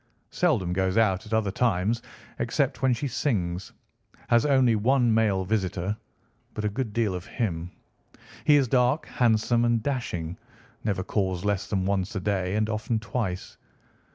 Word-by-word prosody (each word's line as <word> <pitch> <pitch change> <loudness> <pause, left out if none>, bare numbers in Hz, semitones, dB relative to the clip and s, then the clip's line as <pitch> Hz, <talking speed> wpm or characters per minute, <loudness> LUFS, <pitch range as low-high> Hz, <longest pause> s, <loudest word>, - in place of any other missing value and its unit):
Seldom 90 -2 +1
goes 95 +2 0
out 105 -1 +2
at 110 - -6
other 105 -3 +1
times, 110 +1 +1 0.4
except - - 0
when 130 - +3
she 125 +4 -1
sings. 95 - -1 0.6
Has 120 +4 +4
only 130 -5 +4
one 120 +2 +3
male 105 -4 +2
visitor, 95 -1 -1 0.6
but 105 - -3
a - - +2
good 110 +2 -3
deal 110 -3 0
of 90 -1 -6
him. 90 -7 -2 0.7
He 150 - +6
is 140 -3 +4
dark, 125 +5 +2
handsome, 120 0 +2
and 120 -2 +2
dashing, 90 - -3 0.4
never 100 -3 -1
calls 95 -2 -1
less 100 -1 0
than 95 -3 -1
once 100 +2 -1
a - - 0
day, 95 -1 -1
and 110 0 +1
often 110 +1 -1
twice. 110 -4 -4
105 Hz, 155 wpm, -26 LUFS, 95-120 Hz, 0.7 s, He